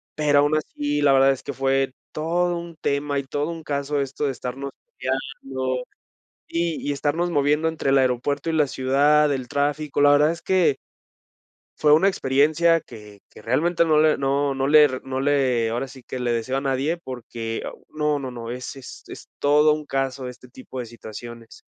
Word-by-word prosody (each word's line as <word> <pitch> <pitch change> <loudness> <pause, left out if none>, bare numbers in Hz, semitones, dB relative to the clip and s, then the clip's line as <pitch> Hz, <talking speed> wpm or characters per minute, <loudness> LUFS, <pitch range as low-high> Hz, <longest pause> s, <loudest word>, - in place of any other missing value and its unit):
pero 145 -2 +3
aún 145 +2 +3
así, 145 -1 -2
la 140 -1 +5
verdad 135 0 +5
es 135 - -4
que 140 - -5
fue 135 0 +1 0.2
todo 175 +3 0
un 170 -1 -8
tema 140 0 0
y - - -4
todo 145 +4 -3
un 165 -1 -7
caso 140 0 -1
esto 140 +2 -3
de 140 - +1
estarnos 130 +2 -6 0.3
peleando 130 -1 -3 0.7
y 170 -3 -2
y - - +1
estarnos 145 +5 -1
moviendo 150 +1 +2
entre 160 -4 -1
el 135 - +5
aeropuerto 135 +4 0
y - - -1
la 150 -2 +3
ciudad, 145 +3 +3
el 130 -2 -3
tráfico, 145 +1 -1
la 145 0 +6
verdad 150 +2 +4
es 170 - -9
que. 180 -7 +2 1.0
Fue 150 -1 +5
una 160 +6 +5
experiencia 160 0 +3
que 105 -5 -13
que - - -15
realmente 165 +9 +2
no 155 -2 +4
le 155 0 +4
no 140 0 0
no 135 0 0
le 145 -2 +5
no 130 0 -3
le 130 -5 +2
ahora 120 +4 -2
sí 130 0 -13
que 130 - -7
le 125 -1 -1
deseo 120 +3 -1
a - - -2
nadie, 140 +4 0
porque 120 -6 -6 0.3
no, 150 -1 0
no, 135 -2 -5
no, 115 -1 -7
es 125 +3 -6
es 130 - -11
es - - -11
todo 150 +1 +4
un 150 0 -5
caso 135 -2 -2
este 125 0 -11
tipo 130 +1 -10
de 120 - -5
situaciones. 115 0 -10
140 Hz, 190 wpm, -23 LUFS, 130-150 Hz, 1.0 s, la